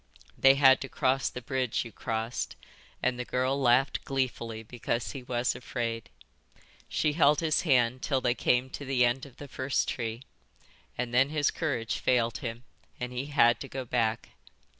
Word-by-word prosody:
They 135 0 +6
had 135 -1 +6
to 135 - -5
cross 135 -1 +1
the 125 - -8
bridge 130 -3 -1
you 115 - -9
crossed, 110 - -3 0.5
and 125 -1 +1
the - - -1
girl 130 +3 0
laughed 130 +2 +3
gleefully 120 -4 -2
because 120 +1 -3
he 135 - -7
was 125 0 -1
afraid. 115 -2 -4 0.8
She 150 - +1
held 150 -2 +4
his 160 -2 +2
hand 125 -5 +2
till 135 -3 +1
they 125 -2 +1
came 125 +1 +1
to - - -6
the 130 -2 +2
end 125 +3 -1
of 130 - -18
the 145 - -9
first 130 0 -1
tree, 115 0 -3 0.7
and 125 -1 -3
then 130 +3 +4
his 150 -1 +1
courage 130 -9 -2
failed 120 -2 +1
him 115 0 -5 0.4
and 125 0 -4
he 125 +3 -3
had 120 -5 +4
to 135 - -6
go 130 -1 -5
back. 115 -2 0
125 Hz, 175 wpm, -29 LUFS, 120-135 Hz, 0.8 s, They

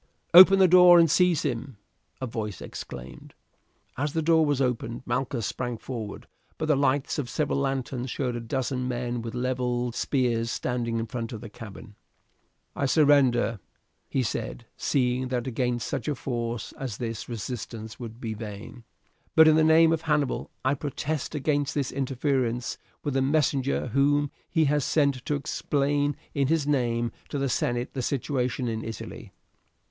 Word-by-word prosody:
"Open 185 +2 +10
the 190 -1 +6
door 180 0 +8
and 165 -3 +5
seize 180 -1 +3
him," 130 -3 -3 0.4
a 130 - -3
voice 110 -5 -4
exclaimed. 65 +2 -9 0.6
As 145 +1 -1
the 160 - 0
door 160 0 +4
was 145 -2 +1
opened 125 -2 -1
Malchus 125 -2 -1
sprang 125 0 -3
forward, 110 -3 -6 0.3
but 160 - -2
the 155 -1 +3
lights 140 +1 +1
of 125 -4 -3
several 140 +2 0
lanterns 135 -2 -2
showed 125 -2 -2
a - - -2
dozen 125 +2 -2
men 120 -1 -2
with 115 +1 -6
levelled 125 -1 -1
spears 120 -3 0
standing 120 -1 -2
in 115 - -1
front 115 0 -5
of 110 - -5
the 115 -3 -9
cabin. 110 0 -10 0.8
"I 140 - 0
surrender," 130 -7 +4 0.5
he 130 - 0
said, 120 +1 -4
seeing 130 -2 0
that 125 -1 -2
against 125 -1 -1
such - - -3
a 150 - 0
force 120 -3 -4
as 125 -6 -4
this 115 -2 -5
resistance 115 -1 -6
would 115 -1 -8
be 115 -3 -4
vain, 110 +2 -8 0.5
"but 160 0 +8
in 155 - +6
the 160 - +4
name 160 +1 +6
of 160 - -1
Hannibal 150 -4 0 0.2
I 130 - +3
protest 145 +2 -3
against 145 -1 0
this 140 -3 -1
interference 130 -2 -1 0.2
with 145 - -2
the 135 - +2
messenger 140 -2 +1
whom 140 +3 +2 0.2
he 160 -2 +2
has 145 0 +2
sent 140 -4 +1
to 145 - +1
explain, 145 0 0 0.2
in 140 -2 +1
his 160 -1 +1
name, 120 -5 0 0.2
to - - -3
the 135 0 0
senate 120 +1 -1
the 130 - -3
situation 130 -1 -1
in 110 -1 -3
Italy." 115 0 -7
130 Hz, 165 wpm, -26 LUFS, 120-145 Hz, 0.8 s, Open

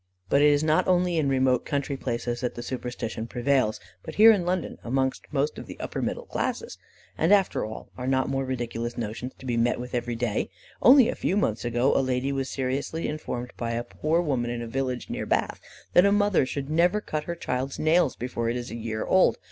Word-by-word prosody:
But 140 - +4
it 150 - +7
is 145 0 +3
not 155 0 +2
only 180 -1 +2
in 145 -3 +2
remote 130 -2 +2
country 140 -1 -2
places 120 -2 -3
that 125 - -2
the 120 - -6
superstition 120 -3 -4
prevails, 125 -2 +1 0.2
but - - -8
here 220 +2 +9
in 185 -5 +1
London, 180 -2 -2
among 130 +2 +1 0.2
most 145 +1 -1
of - - -9
the - - -9
upper - - -4
middle - - -3
classes. - - -3 0.4
And 165 +4 +3
after 200 -2 +3
all, 110 +1 -7
are 125 - -3
not 130 0 +2
more 135 0 -1
ridiculous 120 -2 -3
notions 120 +3 -5
to - - -13
be 120 -2 -1
met 120 +1 +2
with 125 +1 -7
every 120 -1 -1
day? 115 -2 -1 0.3
Only 255 -1 +8
a - - 0
few 190 - -1
months 110 - 0
ago, 120 +3 +1
a - - +4
lady 130 +1 0
was 135 -1 -2
seriously 135 +5 -2
informed 125 -5 -5
by 115 -1 -2
a 120 +1 -1
poor 160 +6 0
woman 130 -7 -1
in 120 0 -3
a - - -6
village 130 0 -2
near - - -4
Bath, - - 0 0.3
that 175 - +7
a - - +3
mother 205 -8 +3
should 135 +1 -4
never 175 +6 +3
cut 155 -7 -4
her 170 - -3
child's 130 -4 -3
nails 155 -2 +3
before 115 -1 -3
it 120 - -1
is 120 -2 -6
a - - -5
year 110 -1 -3
old. 190 - +4
130 Hz, 220 wpm, -26 LUFS, 120-155 Hz, 0.4 s, here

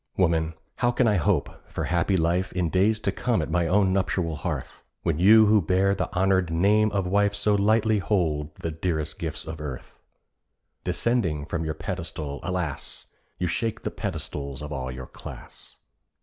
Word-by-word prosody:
Woman, 80 -3 +2 0.2
how 120 - +2
can 120 0 +2
I 105 -2 +3
hope 80 - 0
for - - -3
happy 85 +2 +1
life 85 +3 +1
In 90 -3 0
days 105 +4 +3
to 100 - 0
come 120 +4 0
at 80 0 -2
my 85 0 +2
own 95 +1 +3
nuptial 90 -4 0
hearth, - - -5 0.2
When 85 -2 0
you 110 +4 +8
who 105 0 +5
bear 95 +3 +2
the 100 - -2
honoured 95 -1 +2
name 100 +6 +3
of 100 -2 0
wife 100 +2 +2
So 105 +1 +2
lightly 110 +1 +3
hold 80 -7 0
the 80 - -4
dearest 80 -1 -2
gifts 80 -2 -4
of 80 0 -6
earth? 65 -4 -7 0.8
Descending 90 -5 0
from 80 +2 -3
your 80 0 -2
pedestal, 80 -3 -5
alas! 90 -6 -4 0.3
You 90 - -1
shake 110 +6 -2
the - - -2
pedestals 70 0 -5
of 75 0 -5
all 65 -2 -4
your 65 0 -7
class. - - -10
90 Hz, 175 wpm, -26 LUFS, 80-100 Hz, 0.8 s, you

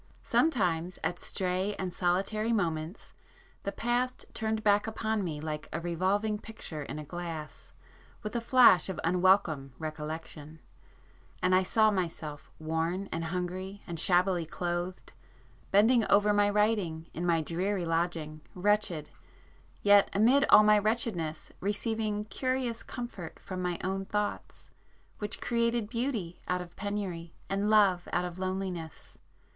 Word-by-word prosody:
Sometimes 180 - +1
at 175 - -1
stray 190 +2 -1
and 185 -2 -4
solitary 195 +6 0
moments 170 -4 -2 0.5
the 200 - -3
past 245 +3 -1
turned 220 -1 -2
back 205 0 +3
upon 220 -1 -1
me 155 -4 -3
like 150 0 -5
a 165 - -2
revolving 190 +5 0
picture 205 -9 -8
in 145 - -6
a 155 - -5
glass 165 -2 -7 0.5
with 210 +2 -5
a 235 - 0
flash 235 -7 +6
of 190 - -4
unwelcome 175 -6 +2
recollection, 155 0 -6 0.8
and 185 +1 +2
I 185 - +6
saw 215 +3 +3
myself 165 -6 -4
worn 165 +5 -2
and 165 - -2
hungry, 185 +3 -4
and 170 -2 -5
shabbily 180 0 +3
clothed, 175 +2 -4 0.6
bending 225 +4 +5
over 205 +1 +5
my 205 0 +4
writing 205 -6 +1
in 170 - -4
my 170 -2 +3
dreary 180 +4 -1
lodging, 165 -2 -1
wretched, 185 -5 0 0.7
yet 205 -1 +6
amid 245 +8 +5
all 215 - +9
my 210 0 +6
wretchedness 210 -7 -2
receiving 210 +1 -1
curious 250 +1 -2
comfort 240 -9 -7
from 185 -1 -6
my 180 -1 -1
own 195 +1 -2
thoughts 210 +1 -4 0.5
which 210 -1 -3
created 235 -2 0
beauty 230 -8 -2
out 180 0 0
of 175 -1 -9
penury, 195 -5 -4 0.2
and 200 +2 +1
love 195 -5 +4
out 175 +1 +1
of 175 0 -7
loneliness. 185 -3 -5
185 Hz, 135 wpm, -30 LUFS, 170-210 Hz, 0.8 s, all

